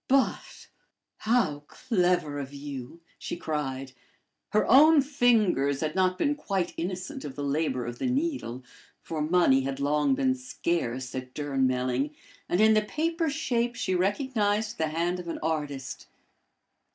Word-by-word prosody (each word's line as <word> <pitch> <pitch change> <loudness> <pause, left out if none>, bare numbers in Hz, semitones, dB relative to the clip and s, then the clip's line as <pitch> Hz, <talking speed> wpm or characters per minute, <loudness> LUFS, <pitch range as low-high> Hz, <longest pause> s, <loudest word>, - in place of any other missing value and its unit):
"But 270 0 0 0.5
how 215 -11 +1
clever 180 - 0
of 140 -1 -6
you!" 140 +2 -7 0.2
she - - -5
cried. 135 -5 -3 0.6
Her 215 - +2
own 305 +5 +7
fingers 215 - +2
had 155 -1 -1
not 185 0 +2
been 290 +7 +2
quite 195 - -2
innocent 185 +2 -4
of 140 -3 -7
the 145 - -4
labor 140 -3 0
of 120 0 -6
the - - -1
needle, 255 - -2 0.4
for 160 -2 -4
money 155 -4 +4
had 135 0 -3
long 150 - +2
been 265 -1 +2
scarce 170 - -3
at 130 0 -6
Durnmelling, 135 -1 0 0.3
and 175 - +1
in 220 0 +6
the 215 - +4
paper 325 +8 -1
shape 245 -5 -1
she 185 - -1
recognized 210 - 0
the 160 - +1
hand 170 +3 -1
of 175 - -8
an 165 - -3
artist. 145 -4 -3
170 Hz, 145 wpm, -27 LUFS, 140-230 Hz, 0.6 s, own